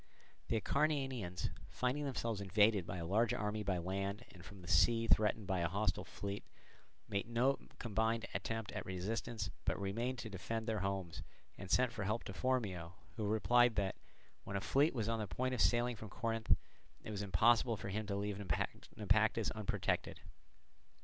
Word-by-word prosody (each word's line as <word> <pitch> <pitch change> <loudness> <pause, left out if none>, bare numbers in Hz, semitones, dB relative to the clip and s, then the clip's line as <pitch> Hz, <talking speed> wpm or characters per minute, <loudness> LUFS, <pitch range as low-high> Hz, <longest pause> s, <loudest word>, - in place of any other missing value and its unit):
The 115 - +1
Acarnanians, 135 - 0 0.2
finding 130 +4 -1
themselves 115 -6 -2
invaded 100 -1 +3
by 90 - -4
a 85 - -4
large 105 +6 +2
army 105 0 -1
by 95 -3 0
land, 100 +5 -3
and 90 -2 -13
from 95 -1 -11
the - - -10
sea 115 +9 +4
threatened 110 -1 +3
by 95 -1 0
a 85 -1 +1
hostile 100 +5 0
fleet, 100 0 -5 0.6
made 100 +3 -2
no 125 +4 +2 0.2
combined 115 0 0
attempt 115 -2 -3
at - - -4
resistance, 100 +2 -3
but - - 0
remained 115 +6 -1
to 115 - -5
defend 105 +4 -3
their 110 -2 0
homes, 95 -3 -2 0.3
and 95 - -8
sent 125 +3 +4
for 115 -3 -4
help 110 +4 0
to 95 - -6
Phormio, 95 -6 -1 0.2
who 110 -3 -2
replied 120 +2 +4
that, 100 -2 0 0.5
when 100 - -5
a - - 0
fleet 140 +6 +3
was 110 -3 0
on 115 0 0
the 105 - -2
point 130 +6 -1
of 125 - 0
sailing 120 0 +3
from 110 0 -8
Corinth, 115 0 +1 0.5
it - - -6
was 100 -1 -3
impossible 110 +4 +4
for 100 - -5
him 105 +2 -2
to 100 - -1
leave 100 0 -2
Naupactus 95 -6 0
unprotected. - - -1
110 Hz, 175 wpm, -37 LUFS, 95-115 Hz, 0.6 s, sea